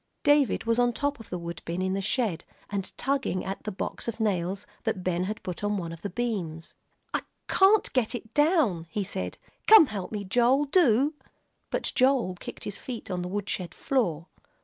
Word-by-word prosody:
David 290 -3 +4
was 230 +1 +1
up - - +6
on 240 0 +2
top 285 +1 -1
of 225 - -12
the 180 - -3
wood 170 0 -6
bin 170 +2 -3
in 190 0 0
the 195 - -1
shed, 215 -3 0 0.3
and 200 -2 -3
tugging 270 -9 -1
at 195 +1 -4
the 215 - -2
box 185 - -5
of 230 -1 -3
nails 195 -3 -1 0.2
that 185 - -1
Ben 180 0 0
had 210 +2 -5
put 180 +2 -5
on 205 0 +1
one 170 -3 -4
of 165 - -9
the 200 - -3
beams. 185 -10 -3 0.4
"I - - +1 0.3
can't 395 +2 +4
get 250 -2 +1
it 225 -1 -8
down," 295 - +3
he 200 +5 -2
said. 190 0 -4 0.3
"Come 435 -6 +10
help 205 -7 -5
me, 210 -2 -3
Joel, 245 +8 +3
do." 285 - +4 0.6
But - - 0
Joel 255 -7 +3
kicked - - -8
his 205 - -5
feet 240 -6 -6
on 180 -1 -1
the 180 - -3
woodshed 190 -3 -3
floor. 175 - 0
210 Hz, 200 wpm, -27 LUFS, 185-255 Hz, 0.6 s, Come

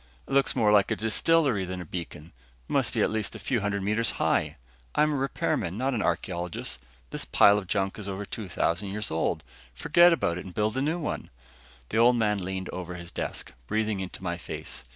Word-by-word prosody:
It - - -5
looks 140 0 +3
more 105 -2 +4
like 100 -2 +5
a 110 - +1
distillery 115 - +3
than 90 0 -4
a 90 - -6
beacon 85 -1 -7 0.4
must - - +1
be - - +3
at - - +1
least 110 -2 -1
a - - -4
few 125 -5 0
hundred 100 0 -1
meters 110 +3 +1
high. - - +1 0.4
I'm 150 0 +4
a - - 0
repairman, 110 -8 -1
not 135 +3 0
an 115 - 0
archeologist. 85 -5 -2 0.3
This - - -2
pile 100 0 +5
of 95 - -9
junk 95 +1 -1
is 100 -1 -5
over 100 +1 -4
2000 95 -2 -2
years 105 +2 -4
old. 80 - 0 0.3
Just - - -11
forget 175 +3 +7
about 90 - +1
it - - -8
and 90 - -10
build 105 +1 +1
a 130 - 0
new 155 +5 0
one." 165 - -4 0.6
The 110 - -1
Old 120 +2 +6
Man 105 -3 +1
leaned 95 0 -3
over 90 -1 -5
his 85 -1 -8
desk, - - -5
breathing 110 +1 0
into 95 0 -6
my 85 -1 -2
face. 75 - -6
105 Hz, 215 wpm, -27 LUFS, 90-115 Hz, 0.6 s, forget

